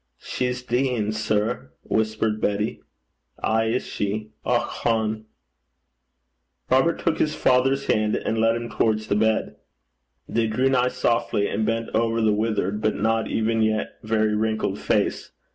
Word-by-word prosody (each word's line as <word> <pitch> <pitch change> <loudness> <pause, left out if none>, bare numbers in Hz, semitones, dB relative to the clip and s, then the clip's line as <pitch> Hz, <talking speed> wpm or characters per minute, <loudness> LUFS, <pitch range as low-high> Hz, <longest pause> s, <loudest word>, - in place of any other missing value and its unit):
'She's 125 - -3
deein', 120 -4 0
sir,' 110 - -1
whispered 110 0 0
Betty. 105 +1 -1 0.6
'Ay 110 0 +2
is 115 +3 0
she. 105 +1 -3
Och - - +2
hone!' 110 -1 -1 1.5
Robert 135 +6 +4
took 165 - 0
his 150 -1 +1
father's 135 +2 +2
hand, 105 0 +1
and 110 - -1
led 115 +1 +3
him 120 0 -4
towards 110 -2 0
the 100 - 0
bed. 110 +1 +1 0.7
They 115 -1 0
drew 125 +5 +1
nigh 125 -1 +3
softly, 120 -5 0
and 110 +1 -1
bent 115 0 -1
over 115 +1 +1
the 110 -2 +3
withered, 105 -1 -1
but 110 - +1
not 110 +1 +1
even 115 0 0
yet 110 -1 0
very 110 -1 +1
wrinkled 110 +1 -1
face. - - 0
110 Hz, 145 wpm, -24 LUFS, 110-120 Hz, 1.5 s, Robert